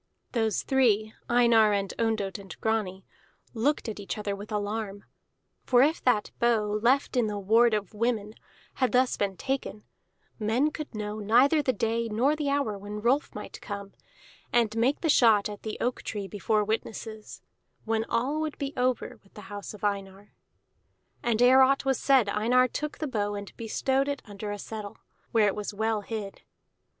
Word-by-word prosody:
Those 225 -4 0
three, 220 -5 +2 0.2
Einar 235 -3 +5
and 200 -1 -1
Ondott 220 -4 -1
and 195 -1 -11
Grani, 210 -4 -1 0.5
looked 260 +4 0
at 215 -2 -5
each 200 - -5
other 205 -1 -3
with 205 +2 -10
alarm. 205 -1 -3 0.6
For 245 0 +5
if 310 +4 +1
that 245 -5 +2
bow, 215 -3 +2
left 260 +4 +2
in 240 -3 +2
the 210 -1 -3
ward 220 +3 +4
of 210 -1 -4
women, 215 -1 -1 0.5
had 255 - +2
thus 255 0 +3
been 195 -2 -2
taken, 265 -6 -3 0.6
men 235 +8 +1
could 305 -6 -7
know 210 0 -4
neither 255 +9 +4
the 265 - +1
day 230 0 -1
nor 250 +8 +2
the 300 -2 -2
hour 280 -8 0
when 205 +1 -6
Rolf 265 +5 +1
might - - -8
come, 200 -2 -7 0.6
and 230 -3 +2
make 245 +6 +1
the 330 - 0
shot 225 -8 +5
at 205 -1 -8
the 220 - -5
oak 245 +1 -1
tree 205 -2 -5
before 210 +1 0
witnesses, 220 0 -5 0.4
when 225 0 0
all 265 +8 0
would 310 -1 -3
be 280 0 -4
over 250 -1 -1
with 195 - -27
the 210 - -9
house 205 -1 -6
of 210 - -15
Einar. 200 0 -3 0.9
And 235 -2 0
ere 260 +2 +7
aught 275 +1 +4
was 270 -2 +1
said 265 -6 +4
Einar 235 +5 +3
took 300 +4 -4
the 310 - -3
bow 205 -5 -1
and 200 -1 -8
bestowed 265 +4 0
it 285 -1 -3
under 205 0 -7
a 205 - -4
settle, 210 0 -7 0.3
where 225 -2 +4
it 200 - +1
was 210 0 -5
well 220 0 0
hid. 205 -2 -6
220 Hz, 180 wpm, -28 LUFS, 205-250 Hz, 0.9 s, ere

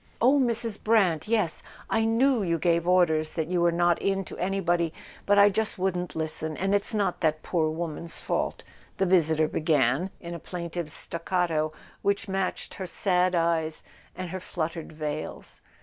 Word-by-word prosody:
"Oh, 265 +5 +5
Mrs. 230 -4 -1
Brant—yes, 210 -2 +2 0.3
I 225 0 +1
know 235 +2 +3
you 170 -3 +1
gave 170 +1 +1
orders 160 -4 +3
that 160 -1 -2
you 180 -1 +1
were 170 0 +4
not 175 0 +2
in 195 -1 0
to - - -9
anybody, 175 -3 +1 0.4
but 205 0 +4
I 200 0 +8
just 220 +2 -1
wouldn't 180 -2 -1
listen, 160 -1 -3
and 195 +1 0
it's 205 +2 +1
not 205 -2 0
that 155 -2 +1
poor 160 -3 +1
woman's 165 0 -5
fault," - - -2 0.3
the 190 - +2
visitor 160 -4 +3
be¬ 155 - -3
gan, 150 +2 +2
in 170 0 -7
a 170 - -5
plaintive 170 -1 -5
staccato 165 -2 -1 0.3
which 200 +1 0
matched 195 -1 -2
her 190 - -5
sad 180 +1 +1
eyes 165 -2 0 0.3
and 185 -2 -5
her 185 - -4
fluttered 165 -2 -4
veils. 155 -1 -5
175 Hz, 165 wpm, -27 LUFS, 160-195 Hz, 0.4 s, I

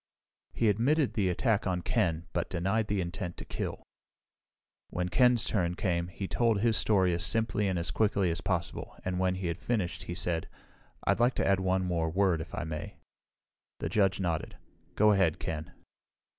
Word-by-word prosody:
He 115 - +1
admitted 130 +8 +2
the 100 -4 +1
attack 105 +3 +1
on 90 -2 -1
Ken, 85 -8 0
but 85 - -1
denied 95 +5 0
the 105 -2 0
intent 90 0 -5
to - - -8
kill. - - -4 1.1
When 90 0 -2
Ken's 125 +3 +4
turn 90 -6 0
came, 85 -2 0
he 95 +2 -5
told 115 -2 +2
his 115 +1 +2
story 95 -5 +3
as 85 0 -1
simply 110 0 +1
and 95 -2 0
as 85 0 -1
quickly 100 -2 +2
as 85 - -3
possible, 85 -4 -3
and 90 0 -1
when 95 0 +1
he 95 0 -4
had 85 -1 -2
finished 105 -8 -1
he 85 - -5
said, 85 -2 -1 0.6
"I'd - - +2
like 120 +2 +3
to - - 0
add 95 -1 +3
one 95 0 +1
more 85 -3 0
word, 90 -1 +2
if 80 - -7
I - - -2
may." 75 -1 -5 0.8
The - - -3
judge 95 0 +2
nodded. 85 -4 -2 0.4
"Go 105 +1 +5
ahead, 95 -6 +3
Ken." 80 +2 -5
95 Hz, 185 wpm, -30 LUFS, 85-105 Hz, 1.1 s, Go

